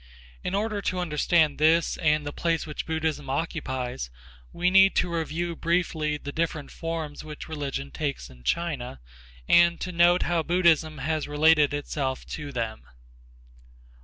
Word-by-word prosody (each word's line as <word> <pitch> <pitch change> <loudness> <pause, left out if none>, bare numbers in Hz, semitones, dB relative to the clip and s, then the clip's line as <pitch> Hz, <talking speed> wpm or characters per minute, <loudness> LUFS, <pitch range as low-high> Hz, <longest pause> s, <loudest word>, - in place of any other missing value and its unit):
In 180 - -2
order 210 0 -1
to 185 - -2
understand 160 -2 +2
this 160 +2 +3
and 150 -1 +2
the 145 - -4
place 165 -2 0
which 150 -2 -6
Buddhism 160 -3 -2
occupies, 130 - -3 0.4
we 180 +1 +1
need 195 0 +6
to 180 -1 +1
review 165 +1 -2
briefly 160 -3 0
the 145 -1 -7
different 160 -2 -2
forms 165 -3 -5
which 155 -1 -8
religion 140 -3 -4
takes 145 -3 -3
in 60 -1 -16
China 130 - -2 0.5
and 170 0 +5
to 185 - -4
note 175 +1 +4
how 175 -1 +1
Buddhism 160 -2 +2
has 155 +3 -2
related 150 0 +4
itself 140 -2 -3
to 150 -2 -5
them. 115 -4 -4
155 Hz, 145 wpm, -26 LUFS, 145-170 Hz, 0.5 s, need